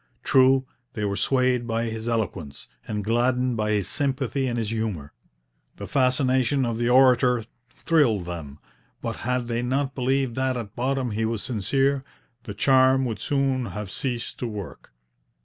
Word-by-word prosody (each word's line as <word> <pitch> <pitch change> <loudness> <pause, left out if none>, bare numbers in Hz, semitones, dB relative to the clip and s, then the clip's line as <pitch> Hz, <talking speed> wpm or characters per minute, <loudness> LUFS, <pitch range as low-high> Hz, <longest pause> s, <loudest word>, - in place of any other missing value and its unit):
True, 130 0 +4 0.3
they 105 -2 -2
were 100 -1 -1
swayed 125 0 +1
by 115 0 -1
his 110 0 -4
eloquence, 100 -11 -3 0.2
and 105 -1 -3
gladdened 125 +3 +1
by 110 -1 -1
his 100 -3 0
sympathy 135 -1 -1
and 120 -1 -2
his 110 -3 -2
humour. 105 -11 -3 0.6
The - - -7
fascination 130 0 +2
of 115 -1 -2
the 120 0 +1
orator 125 -2 +4 0.2
thrilled 125 - +1
them; 80 -5 -7 0.5
but - - -3
had 125 0 -2
they 120 0 -1
not 135 +2 -1
believed 130 -1 0
that 130 -1 0
at 110 -4 -7
bottom 130 0 -1
he 110 +2 -1
was 110 -2 -2
sincere, 135 +5 0 0.4
the 105 -4 -6
charm 130 +3 +4
would 110 -5 -3
soon 135 -1 0
have 100 0 -6
ceased 120 -3 -3
to 125 - -2
work. 100 - -8
120 Hz, 160 wpm, -25 LUFS, 110-130 Hz, 0.6 s, True